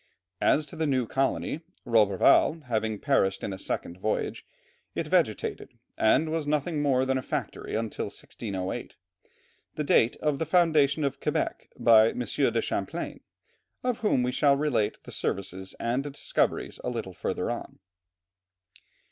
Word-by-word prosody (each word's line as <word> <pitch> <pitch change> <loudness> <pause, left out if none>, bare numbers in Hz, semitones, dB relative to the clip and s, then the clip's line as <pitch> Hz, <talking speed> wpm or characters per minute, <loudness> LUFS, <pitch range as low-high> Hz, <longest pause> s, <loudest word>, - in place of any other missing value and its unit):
As 150 - +3
to 145 - -11
the 160 -1 0
new 130 -3 +1
colony, 135 +5 -1 0.2
Roberval 115 - +4
having 110 -4 -1
perished 95 -7 +1
in 100 - -2
a 95 - -7
second 90 -1 -4
voyage, 110 +3 -2 0.5
it - - -1
vegetated, - - 0 0.2
and 155 +8 +3
was 160 -2 -2
nothing 150 +1 0
more 130 -3 +2
than 130 0 +1
a - - -4
factory - - -4
until 110 -1 -2
1608, 95 -4 -5 0.8
the 150 - -1
date 120 -4 +4
of 150 -2 -1
the 160 - -1
foundation 155 -4 +3
of 140 -1 -1
Quebec - - -2
by 110 -1 +6
M. - - -5
de 120 - +1
Champlain, - - -3 0.6
of 250 -1 0
whom 210 - +2
we 125 - 0
shall 140 +1 +3
relate 140 -8 0
the - - -10
services 95 -1 -3
and 120 +3 0
discoveries 145 -1 -1
a - - -1
little 115 -6 -4
further - - -2
on. - - -6
130 Hz, 150 wpm, -27 LUFS, 110-150 Hz, 0.8 s, by